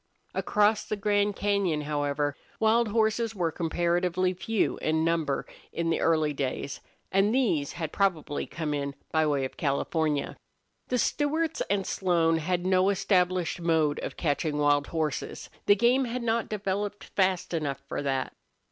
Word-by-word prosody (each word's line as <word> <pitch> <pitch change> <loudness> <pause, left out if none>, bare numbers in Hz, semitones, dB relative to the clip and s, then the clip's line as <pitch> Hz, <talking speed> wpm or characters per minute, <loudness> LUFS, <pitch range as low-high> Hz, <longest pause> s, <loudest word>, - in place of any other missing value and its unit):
Across 210 +1 +2
the 215 - -2
Grand 205 0 +1
Cañon, 195 -7 0
however, 145 -1 -1 0.2
wild 225 +1 +3
horses 220 +1 +1
were 170 -4 0
comparatively 175 +2 0
few 200 +4 0
in 160 +1 +1
number 160 -4 0 0.3
in 165 0 -1
the - - +1
early 155 -2 +2
days; 140 0 -3 0.3
and 200 +4 +3
these 165 - +1
had 160 -3 -4
probably 170 -7 0
come 155 -2 -3
in 140 -1 -3 0.2
by 160 -1 +2
way 140 -3 +1
of 130 - -8
California. 150 +1 0 0.5
The 250 - 0
Stewarts 310 +6 0
and 195 -1 +1
Slone 170 -3 +2
had 175 +2 -1
no 185 +1 +3
established 185 -3 +1
mode 160 -3 +2
of - - -6
catching 150 -1 0
wild 145 -1 +3
horses. 155 -3 -3 0.2
The 205 - +7
game 245 +5 +3
had 245 +1 -3
not 230 0 0
developed 205 0 -2
fast 185 -2 0
enough 140 -4 -2
for - - -3
that. 135 -2 -1
175 Hz, 150 wpm, -28 LUFS, 150-205 Hz, 0.5 s, The